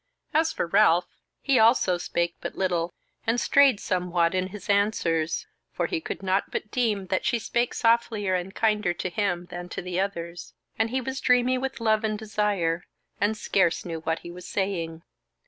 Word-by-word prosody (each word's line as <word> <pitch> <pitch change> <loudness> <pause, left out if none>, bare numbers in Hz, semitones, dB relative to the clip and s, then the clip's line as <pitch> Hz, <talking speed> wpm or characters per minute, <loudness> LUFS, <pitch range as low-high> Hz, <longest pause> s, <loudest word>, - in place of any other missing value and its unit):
As 315 +1 +3
for - - -2
Ralph, 175 -1 +4 0.4
he 270 -4 +3
also 220 -6 +4
spake 170 -1 -1
but - - -5
little, 175 -2 0 0.4
and 230 +2 +2
strayed 275 -6 +5
somewhat 180 -3 0
in 185 0 0
his 200 +1 -10
answers; 185 -6 +1 0.3
for - - 0
he 345 -3 -2
could 195 - -6
not 190 +1 +1
but 215 - -4
deem 215 -6 0
that 185 - +1
she 240 - +1
spake 235 +2 -1
softlier 225 -4 +2
and 185 +2 -2
kinder 210 -5 +1
to 185 - -3
him 175 -2 -1
than 175 0 -6
to - - -5
the 180 0 -2
others; 175 -3 -4 0.2
and 225 0 +2
he 260 +2 -1
was 265 +2 -4
dreamy 250 +1 +3
with 265 -2 -4
love 220 -1 +2
and 215 -1 0
desire, 205 -6 0 0.4
and 210 +2 +1
scarce 185 -5 +1
knew 165 -2 -4
what 160 0 -1
he 170 - -6
was 180 +1 -10
saying. 170 -5 -2
200 Hz, 180 wpm, -26 LUFS, 175-225 Hz, 0.4 s, strayed